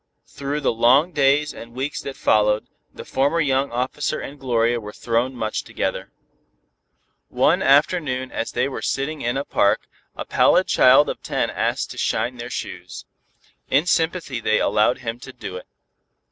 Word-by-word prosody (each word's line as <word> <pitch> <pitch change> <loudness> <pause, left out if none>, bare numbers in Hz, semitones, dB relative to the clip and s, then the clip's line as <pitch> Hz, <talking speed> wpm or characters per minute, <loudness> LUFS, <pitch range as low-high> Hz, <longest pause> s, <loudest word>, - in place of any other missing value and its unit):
Through 140 +2 -4
the 135 - +1
long 130 +9 +4
days 145 -1 +2
and 115 +1 -11
weeks 135 +3 -3
that 140 - -7
followed, 105 0 +2 0.3
the - - -10
former 140 +5 +1
young 135 -3 +1
officer 130 +4 -2
and 140 +1 -8
Gloria 120 -2 +1
were 105 -2 -8
thrown 120 +4 -1
much 110 -2 -2
together. - - -4 1.2
One - - +2
afternoon 140 -2 +2
as 115 - -3
they 125 +2 +1
were 140 - -6
sitting 145 +3 -2
in 120 +2 -1
a 140 - -3
park, 100 0 +2 0.3
a - - -6
pallid - - +3
child - - +5
of - - -5
ten - - -1
asked - - -2
to - - -8
"shine" 125 +1 -1
their 120 +1 -7
shoes. 90 -6 -7 0.6
In 145 +5 +3
sympathy 165 -7 0
they 110 -1 +1
allowed 105 +3 +2
him 115 -1 -5
to 130 - -10
do 95 -7 -8
it. 90 - -9
130 Hz, 165 wpm, -22 LUFS, 115-140 Hz, 1.2 s, child